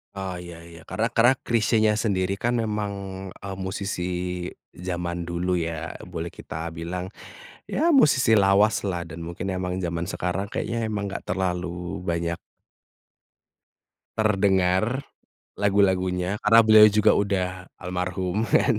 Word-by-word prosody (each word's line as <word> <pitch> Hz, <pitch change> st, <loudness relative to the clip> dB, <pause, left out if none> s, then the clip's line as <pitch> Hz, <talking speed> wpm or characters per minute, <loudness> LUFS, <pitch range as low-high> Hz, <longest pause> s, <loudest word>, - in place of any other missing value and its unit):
Oh 95 Hz, -2 st, -4 dB
iya 85 Hz, -1 st, -9 dB
iya 85 Hz, -1 st, -12 dB
karena 115 Hz, +2 st, 0 dB
kerak 120 Hz, +3 st, +3 dB
Chrisyenya 110 Hz, -2 st, +2 dB
sendiri 100 Hz, -3 st, 0 dB
kan 120 Hz, +3 st, 0 dB
memang, 105 Hz, -2 st, -2 dB, 0.4 s
eee, 95 Hz, 0 st, -7 dB
musisi 95 Hz, -1 st, -3 dB, 0.8 s
zaman 85 Hz, -1 st, -3 dB
dulu 90 Hz, +1 st, -1 dB
ya 85 Hz, -2 st, -3 dB, 0.2 s
boleh 85 Hz, -1 st, -5 dB
kita 80 Hz, +1 st, -5 dB
bilang, 90 Hz, +2 st, -4 dB, 0.6 s
ya 330 Hz, +4 st, +1 dB
musisi 130 Hz, -, +5 dB
lawaslah 100 Hz, -2 st, +3 dB
dan 80 Hz, -, -8 dB
mungkin 85 Hz, +3 st, -4 dB
emang 90 Hz, -1 st, -2 dB
zaman 85 Hz, -1 st, -2 dB
sekarang 90 Hz, +1 st, -2 dB
kayaknya 115 Hz, +2 st, -2 dB
emang 105 Hz, -2 st, -3 dB
enggak -, -, -6 dB
terlalu 90 Hz, -1 st, -1 dB, 0.4 s
banyak 85 Hz, 0 st, -1 dB, 1.8 s
terdengar, 100 Hz, +2 st, +2 dB, 0.6 s
lagu-lagunya, 95 Hz, -1 st, +2 dB
karena 115 Hz, +2 st, +8 dB
beliau 110 Hz, -1 st, +8 dB
juga 105 Hz, 0 st, +4 dB
udah 100 Hz, -2 st, 0 dB, 0.4 s
almarhum 90 Hz, +3 st, -2 dB
kan. 120 Hz, -2 st, +3 dB
95 Hz, 120 wpm, -25 LUFS, 90-105 Hz, 1.8 s, karena